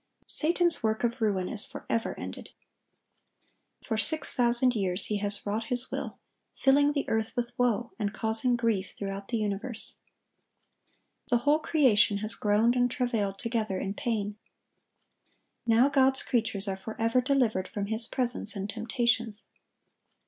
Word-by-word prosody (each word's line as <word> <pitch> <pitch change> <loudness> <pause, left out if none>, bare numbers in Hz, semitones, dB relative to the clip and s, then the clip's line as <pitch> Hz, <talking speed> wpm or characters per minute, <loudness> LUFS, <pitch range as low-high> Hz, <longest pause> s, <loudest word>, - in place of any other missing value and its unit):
Satan's 345 +2 +2
work 220 0 -1
of 240 +1 -1
ruin 195 -4 +1
is 220 - +2
forever 230 - -3
ended. - - -7 1.3
For 220 - -2
six 285 +8 +2
thousand 245 +1 +3
years 190 -2 0
he 210 - -1
has 205 0 -3
wrought 215 +2 -2
his 250 0 -3
will, - - -4 0.4
filling 285 +2 +3
the 285 - -2
earth 220 +1 -1
with 240 -1 -2
woe, 240 -1 +1
and 205 -2 -1
causing 220 +3 +1
grief 225 -5 -1
throughout 195 0 -5
the 235 - -1
universe. 215 +2 -2 1.3
The 245 - +4
whole 295 +2 +4
creation 245 -10 +3
has 215 +2 -3
groaned 215 +4 +2
and 245 0 +2
travailed 230 -7 -1
together 220 -4 -2
in 195 +1 -3
pain. 210 -2 -3 1.3
Now 230 +3 +5
God's 265 -1 +3
creatures 215 -4 -1
are 190 -1 -2
forever 225 +4 0
delivered 245 -8 +1
from 205 -1 -4
his 220 +2 -2
presence 245 -3 +3
and 195 0 -3
temptations. 225 0 -1
225 Hz, 140 wpm, -28 LUFS, 205-245 Hz, 1.3 s, Now